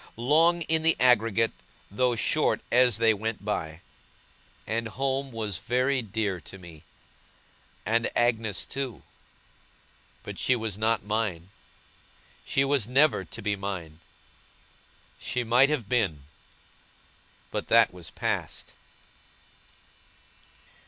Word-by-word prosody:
Long 165 +8 +3
in 160 0 +2
the 165 0 +4
aggregate, 115 -3 +3 0.4
though 125 +3 +1
short 110 - +1
as 125 -2 +4
they 115 -1 +4
went 110 0 -4
by. 80 -6 -3 0.8
And 115 +1 -2
home 135 +3 -2
was 110 -5 -3
very 130 +2 0
dear 105 -4 -3
to 95 - -11
me, 85 -4 -13 1.0
and 115 +3 +1
Agnes 115 -4 +1
too 130 - -5 1.2
but - - -8
she 130 - +2
was 110 -4 -3
not 110 +1 0
mine 105 -5 -2 0.9
she 135 - +1
was 135 -6 +1
never 140 +5 +3
to - - -9
be 105 -1 0
mine. 90 -6 -6 1.2
She 125 0 -2
might 125 +4 +4
have 140 -9 -1
been, 100 - 0 1.3
but - - -3
that - - +5
was 90 -3 -9
past! - - -3
115 Hz, 110 wpm, -27 LUFS, 100-125 Hz, 1.3 s, that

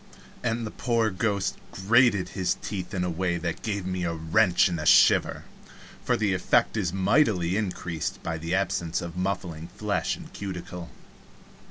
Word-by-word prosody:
and 115 -1 -1
the 105 - -5
poor 115 -3 0
ghost 100 0 -1
grated 105 0 +3
his 95 -3 -1
teeth 95 -3 -4
in 95 -3 -1
a 90 - -1
way 85 +1 -1
that 85 -1 -4
gave 100 -4 -3
me 90 -1 -2
a 85 - 0
wrench 85 +5 +3
and 85 -3 -3
a 75 - -4
shiver - - +5 0.6
for - - +1
the 105 -3 +1
effect 90 +4 +2
is 95 -6 0
mightily 95 - +2
increased 90 -6 -3
by 80 - -2
the 85 +3 -2
absence 95 -3 -1
of 85 -1 -6
muffling 90 -3 -3
flesh 100 -1 -2
and - - -12
cuticle. 90 -3 -6
95 Hz, 165 wpm, -26 LUFS, 85-105 Hz, 0.6 s, shiver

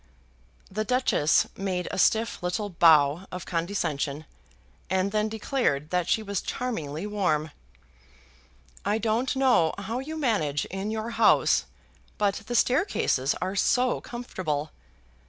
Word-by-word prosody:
The 215 +3 -1
Duchess 230 - +2
made 185 -2 -2
a - - -3
stiff 225 +4 +2
little 180 +4 -2
bow 160 0 +4
of 180 - -6
condescension, 160 -4 -2 0.6
and 190 +2 +1
then 215 0 0
declared 215 - -1
that 180 -1 0
she 220 - +2
was 200 -2 -2
charmingly 165 - -4
warm. 180 -8 0 1.3
"I 205 +2 +1
don't 230 +5 0
know 255 -12 +3
how 220 +5 -4
you 310 +4 -6
manage 200 - 0
in 195 +2 -4
your 220 +1 -3
house, 230 0 +4 0.5
but 205 0 0
the 240 - -3
staircases 235 - +2
are 190 +2 -3
so 250 +5 +2
comfortable. 160 -11 -4
200 Hz, 125 wpm, -26 LUFS, 165-225 Hz, 1.3 s, bow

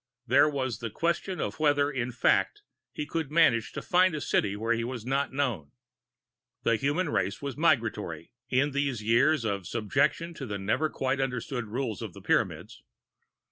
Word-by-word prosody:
And 120 - -16
there 150 - +6
was 130 -7 -2
the 115 - -4
question 170 - -1
of - - -3
whether, 145 -1 +3
in 125 -3 -2
fact, 120 - +1 0.3
he 150 - -4
could 160 -1 -3
manage 150 -8 +3
to - - -5
find 180 -1 +3
a - - -2
city 100 -7 0
where 115 +3 0
he 115 0 -1
was 120 -2 -5
not 135 +2 0
known. 120 - -2 0.9
The 115 - +3
human 145 +8 0
race 95 - -1
was 140 -3 -5
migratory, 110 - 0 0.2
in 135 +3 +2
these 140 -5 -1
years 120 +5 +3
of 100 -4 -2
subjection 135 - 0
to 135 -5 -7
the 105 -2 -3
never 110 +11 0
quite 135 0 -1
understood 125 -2 -3
rule 115 0 -2
of - - -6
the - - -12
Pyramids. - - -1
130 Hz, 180 wpm, -28 LUFS, 110-145 Hz, 0.9 s, there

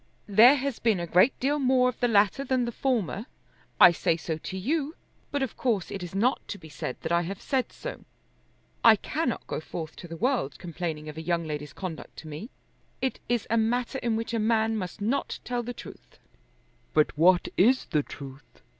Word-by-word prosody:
"There 225 +7 +7
has 275 -2 -2
been 220 -5 +2
a 170 - -2
great 180 +10 +4
deal 290 +3 +1
more 255 -2 +4
of 250 - -3
the 245 - +3
latter 210 +4 +3
than 255 -2 +1
the 235 - -3
former. 230 -4 -1 0.5
I - - +10
say 165 -1 +1
so 160 -1 -4
to 190 - -6
you, 295 - -1 0.3
but 285 -1 -1
of 260 - -4
course 220 -8 0
it 195 - -5
is 175 +1 -7
not 240 +7 +2
to 205 - -5
be 160 -4 -13
said 130 -3 -5
that 160 - -4
I 170 0 +4
have 185 +3 -5
said 265 -2 -1
so. - - -7 0.8
I 225 -1 +9
cannot 270 +4 -2
go - - -3
forth 160 0 -7
to 175 - -9
the 165 0 -7
world 240 - 0
complaining 165 -3 -5
of 150 0 -8
a - - -4
young 170 0 0
lady's 150 -1 -5
conduct 185 -4 -7
to 160 - -9
me. 155 +10 -7 0.5
It 265 - -2
is 240 -3 +1
a 230 - +3
matter 240 +4 0
in 235 -2 0
which 225 +1 -3
a 230 - +1
man 220 0 +2
must 185 -2 -5
not 235 +7 -1
tell 245 -1 -2
the 240 +1 -5
truth." 245 - -12 0.8
"But 155 -1 +3
what 175 +3 +4
is 255 +7 +4
the 150 -3 +1
truth?" 140 0 -11
215 Hz, 205 wpm, -27 LUFS, 170-250 Hz, 0.8 s, I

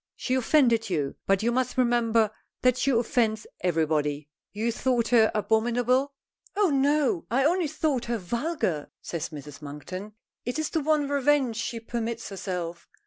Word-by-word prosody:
She 255 - -2
offended 240 -4 +3
you, 145 -6 -1
but 195 +1 +2
you 235 - +2
must 255 +1 -1
remember 230 -3 +3 0.3
that 255 -1 +5
she 275 - 0
offends 230 -3 +1
everybody. 155 -4 0 0.2
You 220 +3 -1
thought 240 -1 0
her 225 -3 +5
abominable?" 240 +5 +1 0.4
"Oh 405 -5 +3
no. 290 +5 +2
I 260 +3 +2
only 345 +1 +2
thought 290 -4 -1
her 235 0 -1
vulgar," 225 - -2
says 165 -2 -4
Mrs. 150 -2 -10
Monkton. 185 +8 -7 0.3
It 245 +3 -3
is 315 -1 -2
the 320 - 0
one 300 -1 +2
revenge 280 -4 +2
she 230 0 -3
permits 230 0 -4
herself. 180 -3 -5
235 Hz, 150 wpm, -27 LUFS, 195-270 Hz, 0.4 s, that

